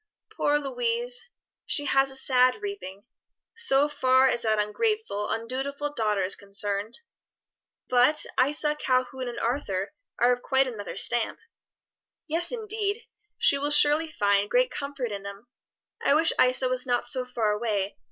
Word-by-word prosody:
"Poor 290 0 +2
Louise! 475 - -2 0.4
she 290 - 0
has 270 -1 +3
a 270 - -4
sad 255 +6 +2
reaping 205 - -7 0.5
so 290 -12 +2
far 265 -2 +3
as 240 - 0
that 220 -2 +1
ungrateful, 210 - -1
undutiful 270 +5 -3
daughter 210 -6 0
is 185 - +1
concerned; 200 - -2 0.9
but 255 +5 +4 0.2
Isa, 295 +2 0
Calhoun, 255 -2 -1
and 240 - -5
Arthur 205 -6 -2 0.2
are 245 +1 +4
of 245 - -5
quite 265 +1 +2
another 215 -5 -7
stamp." 240 -1 +1 0.9
"Yes, 340 +2 -1
indeed! 435 -1 -3 0.3
she 280 - +5
will 290 +1 -1
surely 295 +2 +4
find 200 -4 +1
great - - +2
comfort 280 -4 -4
in 200 -1 -5
them. 200 +2 -9 0.6
I 280 - +4
wish 320 +1 +3
Isa 255 +1 +2
was 255 0 -2
not 245 -1 0
so 255 - +1
far 235 -4 -1
away. 210 -2 -2
255 Hz, 145 wpm, -26 LUFS, 220-295 Hz, 0.9 s, she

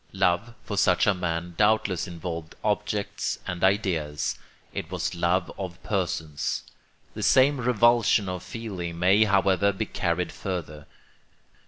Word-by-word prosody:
Love, 95 +5 +1
for 100 - -5
such 90 -3 +4
a 100 - +4
man, 85 -1 -3
doubtless 105 -4 +2
involved 85 -2 -6
objects 105 -1 -1
and 90 -1 -4
ideas: 90 -7 +1 0.4
it - - -4
was - - -2
love 85 +1 0
of 90 -3 -5
persons. 85 -7 -2 0.5
The - - -6
same 135 0 +4
revulsion 120 -3 +4
of 90 -1 -4
feeling 95 -8 -6
may, 95 +5 +5
however, 100 0 +3
be 100 +2 -3
carried 90 -4 -1
further. 75 -6 -5
95 Hz, 130 wpm, -26 LUFS, 85-105 Hz, 0.5 s, may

